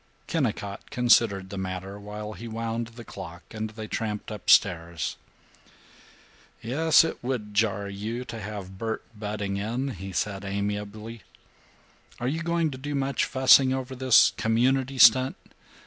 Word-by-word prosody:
Kennicott 105 - -2
considered 110 -6 +3
the 100 - -4
matter 95 +1 -5
while 105 +1 -7
he 115 +2 -8
wound 115 +1 -3
the 120 +1 -11
clock 90 -3 -9
and 110 0 -4
they 110 0 -8
tramped 110 0 -4
up 105 - -6
stairs. 85 -4 +3 1.4
"Yes, 155 +9 +4
it 165 - -4
would 120 -5 -3
jar 105 -1 +1
you 110 +5 -5
to 115 -2 -7
have 95 -2 -7
Bert 110 -1 -3
butting 105 -2 -3
in," 120 +7 -2
he 95 -5 -7
said 95 +2 -2
amiably. 105 +3 -4 1.0
"Are 120 - -2
you 160 +5 -1
going 170 -2 0
to 130 - -8
do 145 +2 -4
much 140 0 0
fussing 130 0 +5
over 130 0 -5
this 130 -2 +5
Community 130 +6 +1
stunt? 130 +2 +6
110 Hz, 145 wpm, -26 LUFS, 100-130 Hz, 1.4 s, stunt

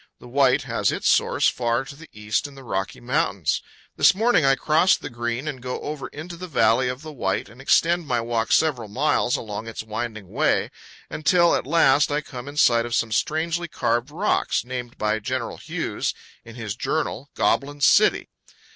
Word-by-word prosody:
The - - -13
White 130 0 +3
has - - 0
its - - -2
source - - +3
far 120 +1 0
to 140 - -10
the 160 +2 -14
east 105 +5 -2
in 140 - -14
the 135 - -12
Rocky 95 - -3
Mountains. - - 0 0.4
This - - +5
morning 225 -4 +3
I 135 0 +4
cross 160 +7 +3
the - - -8
Green 120 +4 -3
and 135 -4 -5
go 125 0 -4
over 150 -2 -5
into 160 +4 -8
the 180 +2 -8
valley 125 -4 +2
of 125 +4 -6
the 155 - -8
White 95 -8 -2
and 120 +5 -14
extend 170 +4 +2
my 125 - +1
walk 115 -1 -2
several 135 -9 +2
miles 125 +2 +1
along 110 0 -5
its 110 -1 -6
winding 110 -2 -5
way, - - +1 0.4
until 170 +3 +3
at - - -1
last 150 -2 +4
I 145 +1 0
come 125 -3 -9
in 145 +1 -8
sight 120 -4 +4
of 120 - -2
some 115 -1 0
strangely 165 +8 -1
carved 120 -5 -1
rocks, 180 - 0
named 125 -1 -6
by 105 0 0
General 130 +1 -3
Hughes, - - -3 0.3
in 115 0 -12
his 110 -4 -5
journal, 140 +1 -2
"Goblin 145 +1 0
City." 140 - +4
130 Hz, 190 wpm, -23 LUFS, 115-150 Hz, 0.4 s, This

